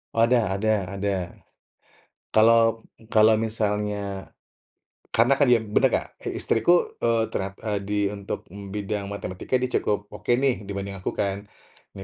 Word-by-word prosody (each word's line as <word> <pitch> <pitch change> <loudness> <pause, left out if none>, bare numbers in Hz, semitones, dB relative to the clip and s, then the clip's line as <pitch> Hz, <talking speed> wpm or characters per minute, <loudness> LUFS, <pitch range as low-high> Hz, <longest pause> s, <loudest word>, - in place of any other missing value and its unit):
Oh 115 - +4
ada 115 -5 +2
ada 105 -2 0
ada. 100 +1 -1 1.2
Kalau 115 0 +4 0.2
kalau 110 0 +6
misalnya 105 -3 -2 0.8
karena 120 +4 +4
kan 145 - +5
dia 120 - +6
bener 105 -2 +2
gak? - - -1
Si - - -4
istriku, 175 +11 +3 0.2
eee, 115 -1 +2
ternyat 95 0 -2
eee, 105 -2 0
di 105 +1 -3 0.2
untuk, 100 -1 -6
mmm, 100 +2 -10
bidang 100 0 -3
matematika 100 +4 -2
dia 125 - -1 0.2
cukup 105 0 -1
oke - - -3
nih 130 -3 +1
dibanding 100 0 -5
aku - - -2
kan. 100 +1 -2 0.5
Nah 95 - -7
105 Hz, 150 wpm, -25 LUFS, 100-115 Hz, 1.2 s, kalau